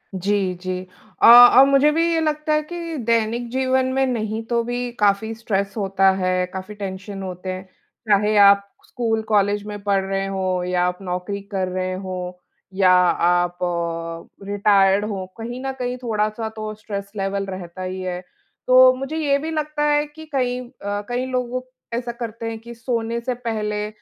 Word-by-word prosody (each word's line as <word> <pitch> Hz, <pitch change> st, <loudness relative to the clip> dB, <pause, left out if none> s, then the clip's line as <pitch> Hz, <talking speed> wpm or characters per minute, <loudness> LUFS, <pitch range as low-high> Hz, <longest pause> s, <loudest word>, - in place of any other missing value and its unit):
जी, 190 Hz, 0 st, 0 dB
जी। 185 Hz, +1 st, -4 dB, 0.4 s
अ, -, -, +6 dB
और 245 Hz, +2 st, +10 dB
मुझे 275 Hz, +2 st, +4 dB
भी 330 Hz, +2 st, +2 dB
ये 325 Hz, -, +2 dB
लगता 305 Hz, 0 st, 0 dB
है 305 Hz, -, +3 dB
कि 335 Hz, 0 st, -6 dB
दैनिक 230 Hz, +1 st, 0 dB
जीवन 260 Hz, 0 st, +1 dB
में 270 Hz, 0 st, +2 dB
नहीं 220 Hz, -3 st, -2 dB
तो 235 Hz, -1 st, +1 dB
भी 245 Hz, +1 st, -3 dB
काफ़ी 205 Hz, +2 st, +2 dB
स्ट्रेस 200 Hz, -3 st, -2 dB
होता 195 Hz, -1 st, +3 dB
है, 185 Hz, -1 st, 0 dB
काफ़ी 190 Hz, +2 st, -7 dB
टेंशन 195 Hz, 0 st, -6 dB
होते 185 Hz, 0 st, -6 dB
हैं। 185 Hz, 0 st, -6 dB, 0.5 s
चाहे 210 Hz, +1 st, +3 dB
आप 200 Hz, 0 st, +7 dB, 0.2 s
स्कूल, 225 Hz, -2 st, -1 dB
कॉलेज 205 Hz, -1 st, +2 dB
में 205 Hz, -1 st, -6 dB
पढ़ 200 Hz, -1 st, +1 dB
रहे 195 Hz, 0 st, -2 dB
हों 185 Hz, -2 st, -1 dB
या 180 Hz, 0 st, +1 dB
आप 180 Hz, 0 st, -2 dB
नौकरी 180 Hz, +2 st, -4 dB
कर 190 Hz, -2 st, -1 dB
रहे 185 Hz, 0 st, -2 dB
हों 180 Hz, -1 st, -4 dB, 0.5 s
या 190 Hz, -2 st, +5 dB
आप 175 Hz, -1 st, +3 dB, 0.9 s
रिटायर्ड 200 Hz, 0 st, +3 dB
हों, 195 Hz, -3 st, -4 dB
कहीं 240 Hz, +2 st, -6 dB
न 270 Hz, -, -1 dB
कहीं 250 Hz, 0 st, -2 dB
थोड़ा-सा 215 Hz, -1 st, -1 dB
तो 215 Hz, -1 st, -5 dB
स्ट्रेस 200 Hz, -2 st, -6 dB
लेवल 195 Hz, 0 st, -1 dB
रहता 185 Hz, -2 st, -7 dB
ही 185 Hz, 0 st, -4 dB
है। 180 Hz, -1 st, -4 dB, 0.5 s
तो 255 Hz, 0 st, +7 dB
मुझे 270 Hz, +5 st, -4 dB
ये 285 Hz, -3 st, +2 dB
भी 315 Hz, +3 st, -4 dB
लगता 305 Hz, -1 st, -2 dB
है 295 Hz, 0 st, +2 dB
कि 310 Hz, +2 st, -12 dB
कई 250 Hz, -2 st, 0 dB
अ, 205 Hz, -5 st, -5 dB
कई 245 Hz, +1 st, -1 dB
लोग 255 Hz, 0 st, -2 dB, 0.3 s
ऐसा 240 Hz, +1 st, -2 dB
करते 230 Hz, -1 st, -6 dB
हैं 225 Hz, -1 st, -6 dB
कि 235 Hz, +1 st, -10 dB
सोने 230 Hz, 0 st, -2 dB
से 250 Hz, +2 st, -2 dB
पहले 215 Hz, -3 st, -3 dB
210 Hz, 175 wpm, -22 LUFS, 195-245 Hz, 0.9 s, और